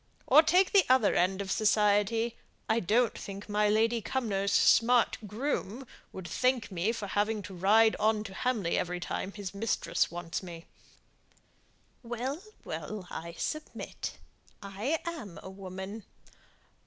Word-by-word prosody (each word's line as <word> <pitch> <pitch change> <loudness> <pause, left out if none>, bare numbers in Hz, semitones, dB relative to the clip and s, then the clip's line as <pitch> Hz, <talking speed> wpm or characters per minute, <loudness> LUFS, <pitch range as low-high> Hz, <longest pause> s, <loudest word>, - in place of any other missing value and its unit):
Or 310 - +8
take 360 +4 +3
the 395 -2 +6
other 255 -5 +4
end 190 +2 +1
of 195 -2 -4
society: 215 +2 +2 0.3
I 220 - +2
don't 225 +4 +2
think 200 0 -8
my 210 0 +2
Lady 225 +2 +2
Cumnor's 200 -2 -1
smart 240 0 +4
groom 240 +1 -3 0.3
would 185 -2 -8
thank 250 +4 0
me 185 +4 0
for 225 -3 -5
having 205 +2 -1
to 195 0 -9
ride 215 +5 +4
on 215 0 +2
to 200 -3 -9
Hamley 215 -6 0
every 180 0 -2
time 190 +2 -4
his 200 -2 -7
mistress 210 +2 0
wants 170 0 -5
me." 170 -3 -9 1.4
"Well, 250 +6 -4 0.2
well, 205 -4 -6
I 170 +1 -6
submit. 310 0 -5 0.4
I 205 +10 -2
am 305 - -6
a 190 - -8
woman. 190 +2 -7
210 Hz, 140 wpm, -30 LUFS, 190-235 Hz, 1.4 s, Or